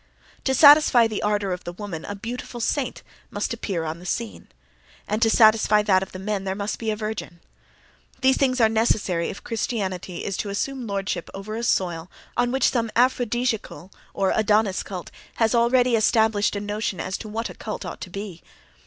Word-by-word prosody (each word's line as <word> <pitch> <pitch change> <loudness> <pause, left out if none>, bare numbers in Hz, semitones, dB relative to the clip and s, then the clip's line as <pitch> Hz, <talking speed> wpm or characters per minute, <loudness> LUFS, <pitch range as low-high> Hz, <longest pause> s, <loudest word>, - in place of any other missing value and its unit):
To 265 - +2
satisfy 285 -4 +7
the 220 -2 -2
ardor 205 -2 0
of 180 - -6
the 175 - -5
woman 180 -4 -6
a 205 - -5
beautiful 240 +3 -6
saint 260 +3 -2 0.3
must 210 0 -3
appear 195 -7 -3
on 160 +1 -4
the 180 - -12
scene, 100 - -4 0.6
and 210 +2 -1
to 225 - +5
satisfy 215 -2 +5
that 190 -3 +3
of 190 - -6
the - - -7
men 195 +1 -3
there 190 0 -2
must 205 +1 -3
be 225 - -2
a 215 - 0
virgin. 215 -5 -5 0.8
These 265 0 +4
things 255 -2 +1
are 225 - +6
necessary 220 -6 +1
if - - -8
Christianity 190 -6 -3
is 195 - -3
to 205 - -3
assume 250 +5 -3
lordship 195 -3 -3
over 200 +2 -6
a 230 - -3
soil 175 -6 0 0.3
on 245 0 +1
which 265 +1 +2
some 230 -3 0
aphrodisiacal 240 - 0 0.2
or 195 -1 +1
Adonis 210 -2 +2
cult 185 -3 -7 0.2
has 225 0 +2
already 245 +1 +3
established 220 -2 +2
a - - -1
notion 205 -2 -3
as 190 - -3
to 215 - -8
what 225 +2 -3
a - - -10
cult 215 - -6
ought - - -7
to - - -6
be. 195 -2 -7
210 Hz, 190 wpm, -24 LUFS, 190-235 Hz, 0.8 s, satisfy